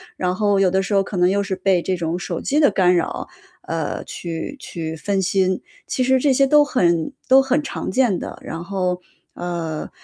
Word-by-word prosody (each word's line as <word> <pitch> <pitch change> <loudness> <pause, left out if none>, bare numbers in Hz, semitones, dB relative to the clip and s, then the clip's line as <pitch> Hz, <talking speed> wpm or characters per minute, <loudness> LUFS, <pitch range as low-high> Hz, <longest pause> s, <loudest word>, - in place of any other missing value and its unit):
然 180 0 -1
后 205 -1 +2
有 195 -1 +4
的 190 +1 +2
时 195 - -3
候 195 - +4
可 195 - -6
能 180 0 +4
又 200 +1 +1
是 195 -1 -2
被 185 -2 +2
这 185 +1 -1
种 170 0 -2
手 175 -1 -4
机 290 - 0
的 290 - +5
干 180 -2 +3
扰， 170 - -2 0.4
呃， - - -3
去 165 - -5
去 160 -8 -5
分 195 +5 -1
心， 185 0 +1 0.2
其 - - -2
实 260 +1 +4
这 280 +2 +3
些 275 +1 +4
都 295 +2 +6
很 170 - +1 0.2
都 265 +1 +7
很 270 +2 +1
常 290 - -4
见 245 -8 +2
的。 - - -7
然 165 +1 -6
后， 180 -1 -2 0.3
呃， 170 -3 -4
190 Hz, 220 characters per minute, -21 LUFS, 175-240 Hz, 0.4 s, 都